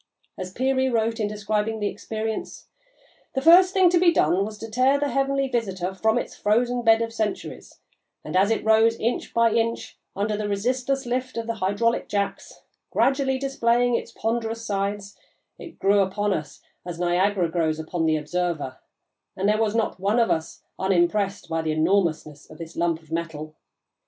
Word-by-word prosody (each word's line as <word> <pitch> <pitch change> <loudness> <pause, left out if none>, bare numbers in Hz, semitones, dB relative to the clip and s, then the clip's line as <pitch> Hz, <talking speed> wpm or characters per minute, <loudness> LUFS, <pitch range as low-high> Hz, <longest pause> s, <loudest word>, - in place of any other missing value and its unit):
As 185 0 -6
Peary 260 +4 +1
wrote, 230 -1 0
in 210 - 0
describing 210 +1 -2
the 205 - -2
experience: 220 +2 -5 0.7
"The 265 - 0
first 360 +4 +7
thing 375 -1 +4
to 350 - +4
be 345 -1 +5
done 180 - +2
was 215 +1 -6
to 225 - -7
tear 260 +4 +3
the 290 0 0
heavenly 275 0 0
visitor 190 -7 -2
from 220 +4 +1
its - - -4
frozen 240 +4 +1
bed 225 -1 +4
of 230 0 -5
centuries, 215 -3 -4 0.5
and, - - -5
as 195 +2 +4
it 225 - -1
rose 220 +1 +4
inch 235 +2 -2
by 230 -1 +3
inch 230 0 -2 0.2
under 210 +2 -1
the 210 0 -3
resistless 255 +6 -1
lift 250 +1 -3
of 230 - -2
the 230 - -2
hydraulic 215 +3 0
jacks, 200 -1 -3 0.3
gradually 270 -1 +1
displaying 245 -2 +1
its 235 - -2
ponderous 225 0 -3
sides, 200 0 -3 0.4
it 335 - -11
grew 200 +1 +3
upon 200 +1 0
us 150 -4 -6 0.2
as 175 -1 -6
Niagara 180 +1 +1
grows 160 -2 0
upon 160 +1 -2
the 155 0 +2
observer, 155 -4 -3 0.6
and 190 +1 0
there 215 +1 +2
was 220 -1 0
not 225 -4 -1
one 200 +4 +1
of 230 -1 +3
us 160 0 -3 0.2
unimpressed 195 +2 +1
by 165 0 -1
the 160 -1 -1
enormousness 155 -3 0
of 155 - -12
this 165 0 -9
lump 170 -1 -1
of 160 - -22
metal. 160 -2 -4
210 Hz, 175 wpm, -24 LUFS, 185-235 Hz, 0.7 s, first